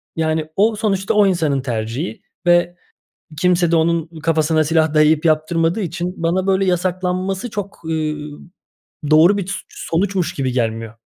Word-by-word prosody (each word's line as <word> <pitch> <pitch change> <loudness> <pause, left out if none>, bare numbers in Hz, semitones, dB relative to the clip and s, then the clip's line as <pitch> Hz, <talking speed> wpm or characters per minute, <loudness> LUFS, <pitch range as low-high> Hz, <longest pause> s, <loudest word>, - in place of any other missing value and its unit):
yani, 160 -1 -1
o 215 +3 +3
sonuçta 200 -3 -1
o 210 -1 +4
insanın 155 -7 0
tercihi 120 +4 -4 0.3
ve 175 0 +3 0.6
kimse 175 0 +2
de - - +4
onun 165 0 0
kafasına 155 0 +1
silah 160 0 +1
dayayıp 155 +1 +3
yaptırmadığı 165 +4 +1
için 175 0 -3
bana 180 +3 0
böyle 195 0 +2
yasaklanması 185 +3 -1
çok, 205 -1 -6
eee, 155 -1 -1 1.0
doğru 165 +6 +6
bir 190 - -3
s 195 - -3
sonuçmuş 185 +1 -2
gibi 130 -2 -2
gelmiyor. 115 -2 -2
170 Hz, 140 wpm, -19 LUFS, 155-185 Hz, 1.0 s, doğru